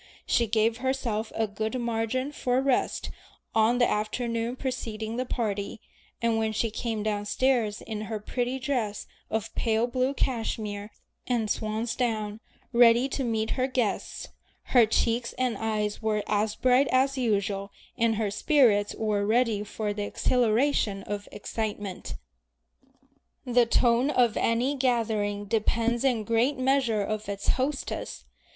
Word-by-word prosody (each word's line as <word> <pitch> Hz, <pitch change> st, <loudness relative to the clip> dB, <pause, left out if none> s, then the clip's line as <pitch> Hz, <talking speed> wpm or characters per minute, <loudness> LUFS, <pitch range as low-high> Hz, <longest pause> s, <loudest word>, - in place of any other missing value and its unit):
She 235 Hz, -, +2 dB
gave 225 Hz, +1 st, +2 dB
herself 245 Hz, -4 st, -2 dB
a 225 Hz, -, +1 dB
good 220 Hz, +4 st, -3 dB
margin 235 Hz, +3 st, -1 dB
for 255 Hz, -3 st, 0 dB
rest 270 Hz, -1 st, 0 dB, 0.4 s
on 225 Hz, +2 st, +3 dB
the 240 Hz, -, +4 dB
afternoon 230 Hz, +2 st, -1 dB
preceding 225 Hz, -4 st, -4 dB
the 255 Hz, 0 st, -2 dB
party, 210 Hz, -4 st, -2 dB, 0.4 s
and 230 Hz, -1 st, +2 dB
when 220 Hz, 0 st, 0 dB
she 225 Hz, +1 st, 0 dB
came 225 Hz, -1 st, -3 dB
downstairs 215 Hz, +2 st, 0 dB
in 215 Hz, -2 st, -5 dB
her 220 Hz, -2 st, -2 dB
pretty 245 Hz, +4 st, -2 dB
dress 245 Hz, -6 st, -2 dB, 0.2 s
of 220 Hz, 0 st, -2 dB
pale 225 Hz, 0 st, +1 dB
blue 255 Hz, +3 st, 0 dB
cashmere 215 Hz, -5 st, -2 dB, 0.4 s
and 230 Hz, -4 st, 0 dB
swan's 220 Hz, +2 st, -2 dB
down, 215 Hz, -4 st, -1 dB, 0.3 s
ready 235 Hz, +1 st, +6 dB
to 275 Hz, -, -2 dB
meet 220 Hz, -2 st, -1 dB
her 255 Hz, 0 st, +1 dB
guests, 245 Hz, -6 st, -2 dB, 0.4 s
her 240 Hz, -4 st, +7 dB
cheeks 235 Hz, +2 st, 0 dB
and 255 Hz, -3 st, 0 dB
eyes 215 Hz, -1 st, -1 dB
were 215 Hz, -1 st, 0 dB
as 210 Hz, 0 st, 0 dB
bright 255 Hz, +2 st, +4 dB
as 265 Hz, +3 st, +2 dB
usual, 200 Hz, -4 st, 0 dB, 0.3 s
and 230 Hz, -2 st, +2 dB
her 210 Hz, -2 st, -1 dB
spirits 210 Hz, -3 st, +3 dB
were 210 Hz, -2 st, 0 dB
ready 220 Hz, -1 st, +2 dB
for 210 Hz, 0 st, -3 dB
the 205 Hz, -, -4 dB
exhilaration 225 Hz, -1 st, +1 dB
of 205 Hz, 0 st, -5 dB
excitement. 205 Hz, -3 st, -4 dB, 1.3 s
The 245 Hz, -1 st, +3 dB
tone 240 Hz, +3 st, +3 dB
of 245 Hz, -6 st, +3 dB
any 240 Hz, +5 st, +1 dB
gathering 220 Hz, -6 st, 0 dB
depends 230 Hz, +3 st, +1 dB
in 245 Hz, -5 st, +2 dB
great 230 Hz, +6 st, +1 dB
measure 255 Hz, -5 st, +2 dB
on 215 Hz, 0 st, -2 dB
its 200 Hz, -1 st, -3 dB
hostess. 270 Hz, +2 st, -2 dB
225 Hz, 140 wpm, -27 LUFS, 215-250 Hz, 1.3 s, her